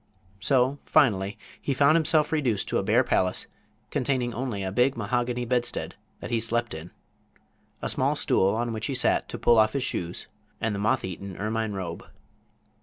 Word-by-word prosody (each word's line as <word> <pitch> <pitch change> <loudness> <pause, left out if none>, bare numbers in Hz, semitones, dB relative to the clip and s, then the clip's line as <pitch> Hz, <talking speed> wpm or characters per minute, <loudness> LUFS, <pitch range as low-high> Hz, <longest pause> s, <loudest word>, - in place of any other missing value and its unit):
So, 130 +6 +2
finally, 105 -10 +2 0.2
he 140 - -1
found 140 +4 +5
himself 160 -2 +3
reduced 125 -11 0
to - - +1
a - - -2
bare - - +3
palace, 90 0 +1 0.5
containing 125 -2 0
only 115 -5 -3
a 95 - -3
big 125 +6 +2
mahogany 120 +2 -1
bedstead 120 0 -1 0.3
that - - -6
he 115 - +2
slept 115 +1 -1
in, 80 +2 -7 0.9
a - - 0
small - - +1
stool 95 +2 +2
on 120 0 -1
which 110 -1 -3
he 135 - -2
sat 125 - +2
to - - -5
pull 120 -1 +4
off 110 0 +4
his 140 - -1
shoes 85 -9 -3 0.3
and 115 -1 -1
the 100 - -3
moth 105 -1 +1
eaten 95 +1 -7
ermine 110 +1 -2
robe. 90 -4 -5
115 Hz, 180 wpm, -26 LUFS, 100-130 Hz, 0.9 s, found